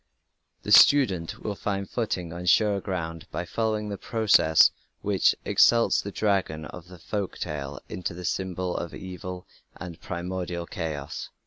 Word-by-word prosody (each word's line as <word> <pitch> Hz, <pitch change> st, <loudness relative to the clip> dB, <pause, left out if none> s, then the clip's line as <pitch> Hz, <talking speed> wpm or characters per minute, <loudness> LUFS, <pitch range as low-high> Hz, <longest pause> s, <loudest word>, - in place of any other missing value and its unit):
The -, -, -4 dB
student 100 Hz, -, +5 dB
will 105 Hz, -, -2 dB
find 100 Hz, -1 st, -3 dB
footing 90 Hz, -8 st, -3 dB
on 90 Hz, +1 st, -6 dB
surer 100 Hz, +2 st, +4 dB
ground 80 Hz, -4 st, -4 dB
by 85 Hz, -, -3 dB
following 110 Hz, +2 st, -1 dB
the 100 Hz, -, -5 dB
process 105 Hz, -9 st, +4 dB, 0.3 s
which 100 Hz, -2 st, +3 dB
exalts 115 Hz, -1 st, +4 dB
the 100 Hz, -, -6 dB
dragon 95 Hz, -7 st, 0 dB
of 90 Hz, +2 st, -10 dB
the 90 Hz, 0 st, -12 dB
folk 100 Hz, +3 st, -4 dB
tale 70 Hz, -2 st, -5 dB
into 85 Hz, -2 st, -5 dB
the 90 Hz, 0 st, -7 dB
symbol 90 Hz, 0 st, -2 dB
of 85 Hz, -, -4 dB
evil 90 Hz, -1 st, -7 dB, 0.3 s
and 85 Hz, -1 st, -9 dB
primordial 90 Hz, 0 st, -4 dB
chaos. 75 Hz, -4 st, -5 dB
90 Hz, 145 wpm, -26 LUFS, 85-100 Hz, 0.3 s, student